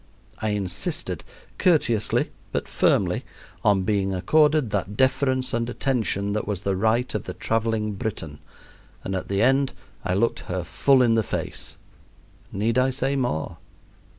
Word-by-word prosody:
I 110 - 0
insisted, 100 -3 -2 0.4
courteously 120 - +2 0.2
but - - -2
firmly, - - +2 0.4
on 100 -3 +3
being 95 -1 0
accorded 150 - +3
that 105 0 -2
deference 130 -1 +2
and 115 0 0
attention 110 -6 0
that 105 - -2
was 100 -3 -2
the 100 -1 0
right 110 +5 +1
of - - -3
the - - -6
traveling 110 -1 0
Briton, 80 -8 -4 0.6
and 95 - -3
at 95 - -3
the 100 +2 +1
end 135 +1 +3 0.3
I 90 - 0
looked 115 +4 +1
her 90 -1 -2
full 135 +8 +3
in 115 -2 +4
the 115 - +3
face. - - -4 0.7
Need 110 +5 +1
I 130 +1 +3
say 135 +1 -1
more? 90 - -2
110 Hz, 150 wpm, -24 LUFS, 100-130 Hz, 0.7 s, in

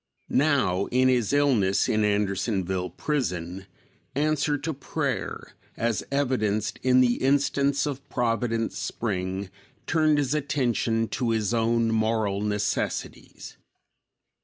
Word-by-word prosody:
Now, 130 -11 +2
in 130 +1 +3
his 125 -4 +2
illness 130 -10 +3
in 110 -1 +1
Andersonville 95 -2 0
prison, 95 - -3 0.5
answer 150 0 +1
to 160 +3 -3
prayer, 135 - -4 0.2
as 115 -1 0
evidenced 115 -7 0
in 130 0 +4
the 120 -1 +3
instance 140 0 +2
of 140 -2 -5
Providence 115 -1 -1
Spring, 95 -3 -3 0.3
turned 155 -2 +3
his 145 -1 +1
attention 125 -6 0
to 120 - -1
his 110 -1 0
own 115 0 +2
moral 110 -2 0
necessities. 105 0 -3
115 Hz, 110 wpm, -26 LUFS, 105-140 Hz, 0.5 s, in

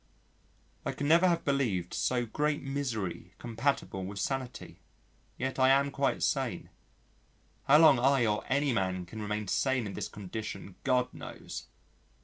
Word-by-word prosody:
I - - -2
could 145 - -4
never 170 +5 +5
have 170 -1 +1
believed 115 -11 0
so 125 -1 0
great 150 +6 -1
misery 110 -11 -3
compatible 115 -4 -1
with 100 +2 -6
sanity. 130 +3 -4 0.6
Yet 130 +1 -3
I 130 0 +6
am 140 +1 +4
quite 140 -1 0
sane. - - -1 0.9
How 145 - +7
long 155 -5 +7
I 135 -1 +4
or 105 -1 0
any 140 0 +2
man 95 -4 -1
can 110 +5 -8
remain 105 0 -3
sane 130 +3 +1
in 100 - -5
this - - -4
condition 105 -1 -6
God 125 -2 +1
knows.... - - -8
125 Hz, 145 wpm, -30 LUFS, 105-140 Hz, 0.9 s, How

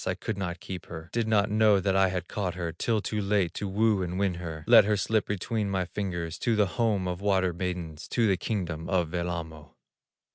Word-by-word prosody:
I - - 0
could 110 - -4
not 90 -3 -4
keep 95 -2 -7
her, 80 0 -8
Did 115 -1 0
not 105 -2 +2
know 105 -2 +5
that 95 0 0
I 95 0 +5
had 90 -2 -3
caught 95 -4 -3
her 85 -2 -3
Till 110 +5 0
too 105 -1 -2
late 100 -4 +1
to 105 - -4
woo 105 +1 +2
and 90 0 -3
win 100 -2 +1
her; 80 -2 -6
Let - - +8
her 105 0 +2
slip 110 +2 0
between 105 +1 -2
my 95 -2 0
fingers 85 -3 -4
To 115 - +1
the 105 -1 +4
home 105 -2 0
of 90 +1 -3
water 95 -3 +2
maidens, 85 -3 -4
To 120 - +1
the 100 -3 +3
kingdom 85 -6 -3
of 90 -4 +1
Wellamo." 85 -3 -4
95 Hz, 220 wpm, -28 LUFS, 85-105 Hz, -, Let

